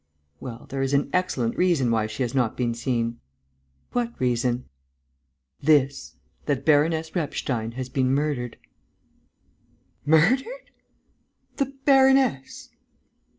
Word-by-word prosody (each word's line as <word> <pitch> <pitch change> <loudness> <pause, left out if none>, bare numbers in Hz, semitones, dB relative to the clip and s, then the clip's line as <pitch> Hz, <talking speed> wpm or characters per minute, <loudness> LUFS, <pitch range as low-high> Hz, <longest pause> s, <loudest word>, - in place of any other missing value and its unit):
"Well, 120 -2 -8
there 135 0 -3
is 135 +1 +1
an 140 - 0
excellent 140 -11 0
reason 165 -10 +2
why 110 -1 +1
she 110 +4 -3
has 120 - -3
not 125 -5 0
been 120 -2 0
seen." 115 -1 -2 0.7
"What 240 -1 -2
reason?" 125 0 0 1.0
"This, 140 -2 +2 0.3
that 140 -2 -1
Baroness 160 +1 +2
Repstein 125 -8 -2
has 130 +1 -5
been 130 0 0
murdered...." 135 -4 -1 1.5
"Murdered!... 245 - +2 0.9
The 275 -1 -2
baroness!... 265 - +3
135 Hz, 110 wpm, -24 LUFS, 125-165 Hz, 1.5 s, baroness